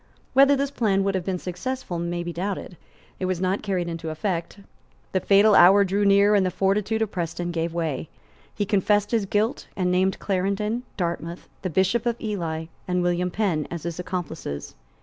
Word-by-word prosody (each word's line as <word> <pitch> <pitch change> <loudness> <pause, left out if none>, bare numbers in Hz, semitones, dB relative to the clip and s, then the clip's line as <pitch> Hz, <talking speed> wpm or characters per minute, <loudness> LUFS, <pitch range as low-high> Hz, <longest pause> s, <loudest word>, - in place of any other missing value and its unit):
Whether 275 +2 +6
this 280 0 -1
plan 200 -7 +1
would 195 0 0
have 190 -2 -1
been 190 -2 -1
successful 180 +1 -4
may 175 0 -2
be 175 0 -5
doubted; 185 0 -4 0.4
it 185 - -1
was 185 -2 -1
not 185 +2 0
carried 185 -4 -1
into 165 -1 -4
effect; 170 +3 -3 0.5
the 190 - +1
fatal 200 +3 +5
hour 195 +2 +8
drew 200 +2 0
near; 200 +1 +5
and 200 -2 +4
the 185 - +1
fortitude 205 +4 +1
of 215 - -4
Preston 175 0 -3
gave 165 0 -1
way. 160 -4 -3 0.5
He 205 - 0
confessed 205 +1 +2
his 220 -4 +1
guilt, 215 +5 0
and 180 -1 0
named 185 +1 +2
Clarendon, 200 +4 -1 0.2
Dartmouth, 170 -1 -3
the 185 - -2
Bishop 190 +7 +1
of 235 0 -1
Ely 170 -7 -3 0.2
and 180 -1 +1
William 175 +1 +1
Penn, 180 -6 0
as 170 -2 -6
his 170 0 -4
accomplices. 165 - -5
185 Hz, 185 wpm, -24 LUFS, 175-205 Hz, 0.5 s, hour